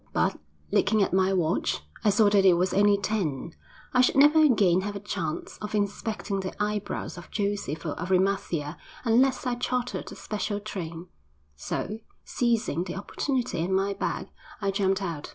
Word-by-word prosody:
But, -, -, +1 dB, 0.3 s
looking 210 Hz, +1 st, +3 dB
at -, -, -1 dB
my 190 Hz, 0 st, +3 dB
watch, 175 Hz, -4 st, 0 dB, 0.2 s
I 215 Hz, -, +4 dB
saw 205 Hz, +1 st, +4 dB
that 200 Hz, -1 st, +5 dB
it 190 Hz, -2 st, +7 dB
was 180 Hz, +1 st, +1 dB
only 205 Hz, 0 st, +5 dB
ten. 170 Hz, -8 st, -2 dB, 0.4 s
I 250 Hz, -, +5 dB
should 255 Hz, -, +3 dB
never 295 Hz, +3 st, +7 dB
again 205 Hz, -, +4 dB
have 205 Hz, +1 st, -4 dB
a -, -, -3 dB
chance 190 Hz, -6 st, -4 dB
of 210 Hz, 0 st, -4 dB
inspecting 205 Hz, 0 st, -2 dB
the 190 Hz, -1 st, -4 dB
eyebrows 210 Hz, -3 st, -2 dB
of 175 Hz, -, -13 dB
Joseph 200 Hz, -7 st, -2 dB
of 150 Hz, -, -3 dB
Arimathea 185 Hz, -5 st, 0 dB, 0.3 s
unless 255 Hz, +3 st, +3 dB
I 250 Hz, -, +1 dB
chartered 245 Hz, 0 st, -2 dB
a -, -, -8 dB
special 205 Hz, -1 st, -3 dB
train, 175 Hz, -5 st, -6 dB, 0.5 s
so, 210 Hz, -, -4 dB, 0.3 s
seizing 230 Hz, -, 0 dB
the 175 Hz, -, -5 dB
opportunity 240 Hz, -, -2 dB
and 190 Hz, +2 st, 0 dB
my 195 Hz, +1 st, +1 dB
bag, -, -, -3 dB, 0.3 s
I 200 Hz, -1 st, 0 dB
jumped 195 Hz, 0 st, +1 dB
out. 165 Hz, -5 st, -4 dB
200 Hz, 170 wpm, -27 LUFS, 185-215 Hz, 0.5 s, it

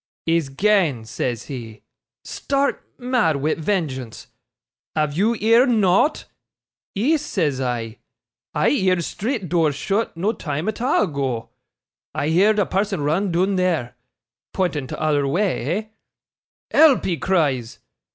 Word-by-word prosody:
"He's 165 Hz, -3 st, +1 dB
gane," 160 Hz, -, +1 dB
says 120 Hz, +1 st, -3 dB
he, 115 Hz, -6 st, -8 dB, 0.4 s
stark 280 Hz, 0 st, -1 dB
mad 245 Hz, -, +1 dB
wi' 145 Hz, +3 st, 0 dB
vengeance. 150 Hz, -, -3 dB, 0.7 s
"Have 150 Hz, -2 st, 0 dB
you 210 Hz, +7 st, +2 dB
heerd 230 Hz, +4 st, +4 dB
nought?" 215 Hz, -, +2 dB, 0.7 s
"Ees," 290 Hz, +9 st, +1 dB
says 150 Hz, -, -1 dB
I, 120 Hz, -3 st, -3 dB, 0.6 s
"I -, -, +3 dB
heerd 185 Hz, -9 st, +2 dB
street 220 Hz, -, -3 dB
door 165 Hz, -2 st, +2 dB
shut, 195 Hz, +7 st, -2 dB
no 200 Hz, +6 st, 0 dB
time 155 Hz, -4 st, -4 dB
at 220 Hz, +1 st, -3 dB
a' 255 Hz, -3 st, +2 dB
ago. 135 Hz, -, -3 dB, 0.7 s
I 150 Hz, -, -1 dB
heerd 200 Hz, +6 st, +4 dB
a 205 Hz, -, +3 dB
person 195 Hz, -3 st, -1 dB
run 170 Hz, +7 st, 0 dB
doon 185 Hz, +3 st, +1 dB
there" 165 Hz, -10 st, 0 dB, 0.6 s
(pointing 160 Hz, -8 st, -1 dB
t'other 145 Hz, 0 st, 0 dB
wa' 140 Hz, +5 st, 0 dB
eh?) 185 Hz, -, 0 dB, 0.9 s
"Help!" 310 Hz, -5 st, +5 dB
he 175 Hz, -3 st, 0 dB
cries. 145 Hz, -12 st, 0 dB
175 Hz, 130 wpm, -21 LUFS, 140-210 Hz, 0.9 s, Help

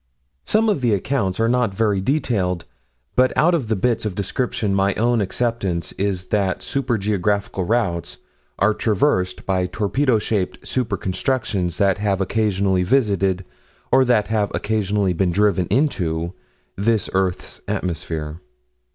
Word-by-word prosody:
Some 225 Hz, +1 st, +2 dB
of 200 Hz, -10 st, +1 dB
the 115 Hz, -4 st, +3 dB
accounts 100 Hz, -3 st, -1 dB
are 115 Hz, -, +3 dB
not 120 Hz, -4 st, +1 dB
very 105 Hz, -2 st, +1 dB
detailed, 95 Hz, -, 0 dB, 0.5 s
but 130 Hz, 0 st, +4 dB
out 175 Hz, +3 st, +4 dB
of 145 Hz, -9 st, 0 dB
the 110 Hz, -, +1 dB
bits 115 Hz, +4 st, 0 dB
of 105 Hz, -4 st, -3 dB
description 105 Hz, 0 st, -1 dB
my 95 Hz, 0 st, +2 dB
own 120 Hz, 0 st, +2 dB
acceptance 95 Hz, -6 st, -1 dB
is 95 Hz, -2 st, -2 dB
that 100 Hz, -3 st, 0 dB
super 135 Hz, -4 st, 0 dB
geographical 100 Hz, -1 st, -1 dB
routes 90 Hz, -7 st, -1 dB, 0.4 s
are 105 Hz, +2 st, +3 dB
traversed 100 Hz, -4 st, 0 dB
by 95 Hz, -1 st, 0 dB
torpedo 115 Hz, +6 st, +1 dB
shaped 105 Hz, -3 st, -2 dB
super 115 Hz, -6 st, -1 dB
constructions 95 Hz, -, -1 dB
that 100 Hz, -1 st, +2 dB
have 100 Hz, -2 st, 0 dB
occasionally 95 Hz, -2 st, +1 dB
visited, 95 Hz, -4 st, +1 dB, 0.5 s
or 130 Hz, -, +6 dB
that 120 Hz, -5 st, +2 dB
have 105 Hz, -2 st, +1 dB
occasionally 105 Hz, -3 st, 0 dB
been 90 Hz, +2 st, +1 dB
driven 95 Hz, -2 st, +2 dB
into 85 Hz, -, 0 dB, 0.4 s
this 110 Hz, +2 st, +1 dB
earth's 95 Hz, -1 st, -1 dB
atmosphere. 80 Hz, -2 st, -3 dB
100 Hz, 140 wpm, -21 LUFS, 95-115 Hz, 0.5 s, or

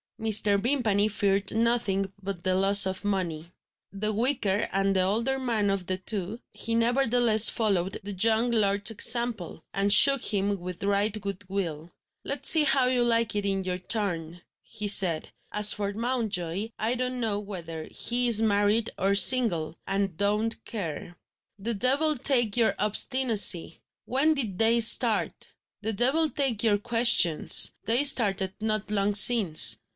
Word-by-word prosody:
Mr. 215 Hz, -2 st, +2 dB
Vimpany 220 Hz, -4 st, -1 dB
feared 200 Hz, -1 st, -2 dB
nothing 220 Hz, -4 st, -2 dB
but 190 Hz, -3 st, -8 dB
the 185 Hz, -, -1 dB
loss 195 Hz, +1 st, +6 dB
of 190 Hz, +1 st, -6 dB
money. 175 Hz, -5 st, -5 dB, 0.4 s
The 215 Hz, +2 st, -4 dB
weaker 215 Hz, -4 st, -2 dB
and 195 Hz, 0 st, -1 dB
the 190 Hz, -, +1 dB
older 230 Hz, +8 st, -2 dB
man 225 Hz, -6 st, -2 dB
of 190 Hz, -3 st, -5 dB
the 185 Hz, -, -3 dB
two, 200 Hz, +2 st, -6 dB
he 230 Hz, -, -5 dB
nevertheless 235 Hz, -2 st, +2 dB
followed 195 Hz, -4 st, -3 dB
the 205 Hz, +1 st, -6 dB
young 225 Hz, +5 st, +1 dB
lord's 200 Hz, -2 st, 0 dB
example, 225 Hz, -7 st, -1 dB
and 200 Hz, +1 st, 0 dB
shook 275 Hz, +3 st, +6 dB
him 200 Hz, -1 st, -2 dB
with 180 Hz, +1 st, -10 dB
right 200 Hz, +2 st, -1 dB
good 200 Hz, -1 st, -8 dB
will. 170 Hz, -4 st, -6 dB, 0.3 s
"Let's -, -, -1 dB
see 315 Hz, -2 st, +5 dB
how 270 Hz, -2 st, +3 dB
you 250 Hz, -1 st, -1 dB
like 230 Hz, -2 st, -1 dB
it 205 Hz, -1 st, -3 dB
in 195 Hz, -1 st, -3 dB
your 180 Hz, -1 st, -5 dB
turn," 175 Hz, -5 st, -5 dB, 0.2 s
he 210 Hz, -2 st, -7 dB
said. 185 Hz, -5 st, +3 dB, 0.2 s
"As 210 Hz, 0 st, +2 dB
for 200 Hz, -1 st, -5 dB
Mountjoy, 215 Hz, -5 st, -4 dB
I 225 Hz, +3 st, 0 dB
don't 255 Hz, 0 st, -5 dB
know 215 Hz, -4 st, -3 dB
whether 170 Hz, -6 st, -9 dB
he 245 Hz, +1 st, -1 dB
is 225 Hz, -2 st, +4 dB
married 210 Hz, +1 st, -1 dB
or 195 Hz, +1 st, 0 dB
single 200 Hz, -9 st, +4 dB
and 195 Hz, -3 st, -3 dB
don't 210 Hz, +3 st, -3 dB
care." 175 Hz, -4 st, -7 dB, 0.4 s
"The 225 Hz, +4 st, -3 dB
devil 275 Hz, +8 st, +1 dB
take 240 Hz, -5 st, +2 dB
your 230 Hz, -2 st, 0 dB
obstinacy! 210 Hz, -5 st, 0 dB, 0.2 s
When 295 Hz, +5 st, 0 dB
did 220 Hz, -10 st, -4 dB
they 230 Hz, +1 st, +3 dB
start?" 230 Hz, 0 st, +3 dB, 0.3 s
"The 220 Hz, +1 st, -4 dB
devil 270 Hz, +9 st, 0 dB
take 265 Hz, -8 st, -2 dB
your 210 Hz, -3 st, +1 dB
questions! 230 Hz, -7 st, +3 dB
They 235 Hz, +6 st, +2 dB
started 200 Hz, -9 st, +1 dB
not 215 Hz, -1 st, -3 dB
long 200 Hz, 0 st, +1 dB
since." 210 Hz, -7 st, +5 dB
210 Hz, 155 wpm, -24 LUFS, 195-235 Hz, 0.4 s, loss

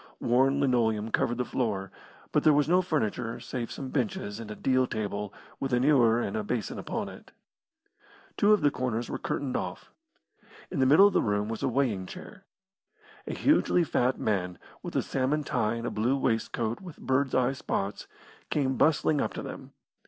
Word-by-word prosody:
Worn 135 Hz, +3 st, +3 dB
linoleum 115 Hz, -5 st, +1 dB
covered 120 Hz, +2 st, +1 dB
the 125 Hz, -, -1 dB
floor, 100 Hz, -8 st, -2 dB, 0.4 s
but -, -, +3 dB
there 155 Hz, -2 st, +6 dB
was 145 Hz, -1 st, +3 dB
no 180 Hz, +3 st, +4 dB
furniture 125 Hz, -, -2 dB
save 120 Hz, -3 st, -5 dB
some 135 Hz, -, -6 dB
benches 110 Hz, -5 st, -2 dB
and 115 Hz, -2 st, -8 dB
a 105 Hz, -, -6 dB
deal 130 Hz, +1 st, +2 dB
table 105 Hz, -2 st, -3 dB, 0.3 s
with 135 Hz, -2 st, -2 dB
an 125 Hz, 0 st, +3 dB
ewer 120 Hz, -6 st, +4 dB
and 100 Hz, -, -2 dB
a 110 Hz, -, -1 dB
basin 115 Hz, +1 st, -3 dB
upon -, -, -3 dB
it. -, -, -12 dB, 1.0 s
Two 205 Hz, -, +4 dB
of 210 Hz, -, +5 dB
the 145 Hz, -1 st, +3 dB
corners 120 Hz, -3 st, -2 dB
were -, -, -3 dB
curtained 135 Hz, -3 st, -3 dB
off. -, -, -4 dB, 0.8 s
In -, -, -2 dB
the 130 Hz, -, +4 dB
middle 155 Hz, +9 st, +8 dB
of 205 Hz, -, +4 dB
the -, -, +3 dB
room 105 Hz, 0 st, 0 dB
was 115 Hz, -, -4 dB
a -, -, +1 dB
weighing 120 Hz, -8 st, 0 dB
chair. 195 Hz, -, -11 dB, 0.8 s
A -, -, -3 dB
hugely 275 Hz, -, +3 dB
fat 130 Hz, -4 st, +1 dB
man, 90 Hz, -4 st, -1 dB, 0.2 s
with -, -, -7 dB
a -, -, +2 dB
salmon 135 Hz, +3 st, 0 dB
tie 115 Hz, -5 st, 0 dB
and 115 Hz, 0 st, -5 dB
a -, -, -2 dB
blue 120 Hz, +6 st, +1 dB
waistcoat 115 Hz, -2 st, -1 dB
with 180 Hz, -5 st, -10 dB
birds' 130 Hz, 0 st, 0 dB
eye 130 Hz, +1 st, +2 dB
spots, 100 Hz, -6 st, -3 dB, 0.4 s
came 135 Hz, -3 st, 0 dB
bustling 155 Hz, -1 st, +3 dB
up -, -, -2 dB
to -, -, -5 dB
them. -, -, -8 dB
125 Hz, 190 wpm, -28 LUFS, 110-140 Hz, 1.0 s, middle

